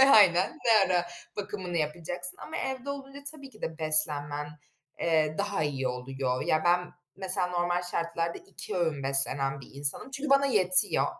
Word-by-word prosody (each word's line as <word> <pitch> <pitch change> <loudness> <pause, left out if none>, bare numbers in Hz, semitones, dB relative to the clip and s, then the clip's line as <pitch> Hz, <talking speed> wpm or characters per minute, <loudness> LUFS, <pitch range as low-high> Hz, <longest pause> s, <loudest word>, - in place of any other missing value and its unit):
Aynen, 180 -3 +5
ne 230 - +5 0.2
ara 175 - +2 0.3
bakımını 190 -3 -4
yapacaksın 175 +3 -3
ama 315 - -5
evde 265 +1 -3
olunca 275 0 -6
tabii 280 -3 -11
ki 215 -4 -18
de 160 -1 -4
beslenmen, 150 -2 0 0.5
eee, 155 -2 +2
daha 200 -5 0
iyi 135 -3 -1
oluyor. 125 0 -2
Ya, 155 - +2
ben, 175 0 +3 0.2
mesela 185 -1 -1
normal 175 0 0
şartlarda 170 -1 -2
2 - - -7
öğün 160 -6 0
beslenen 135 0 0
bir - - -12
insanım. 140 - -2
Çünkü 275 +1 -4
bana 275 0 +5
yetiyor 200 -5 +4
175 Hz, 155 wpm, -29 LUFS, 150-200 Hz, 0.5 s, Aynen